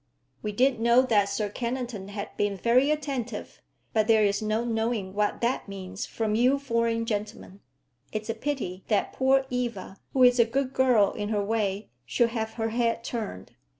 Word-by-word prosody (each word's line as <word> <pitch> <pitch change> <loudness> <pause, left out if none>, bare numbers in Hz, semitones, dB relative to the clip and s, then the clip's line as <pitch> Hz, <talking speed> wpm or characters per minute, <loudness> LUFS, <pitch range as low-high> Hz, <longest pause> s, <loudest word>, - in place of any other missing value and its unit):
"We 210 - -3
did 250 +3 +2
know 235 +2 +5
that 210 -6 +2
Sir 205 +1 -1
Kennington 235 -2 -4
had 200 0 -6
been 205 -1 0
very 245 +8 +3
attentive, 280 -6 -3 0.3
but 215 -2 +2
there 220 -2 +5
is 200 0 +1
no 215 +2 0
knowing 225 -4 -1
what 210 0 0
that 240 0 0
means 195 -1 -6
from 220 -2 -2
you 250 +5 +4
foreign 230 -4 0
gentlemen. 205 -2 -4 0.5
It's 215 0 -4
a 225 - -1
pity 225 -7 -4
that 210 - +1
poor 265 0 +3
Eva, 235 -6 -3 0.2
who 260 - +4
is 245 0 +6
a 235 - +7
good 260 +3 -1
girl 250 -7 +4
in 205 0 -4
her 210 -2 0
way, 205 - -1
should 235 - +1
have 220 -1 -3
her 225 -1 -2
head 230 0 0
turned." 215 - -5
225 Hz, 180 wpm, -27 LUFS, 205-245 Hz, 0.5 s, a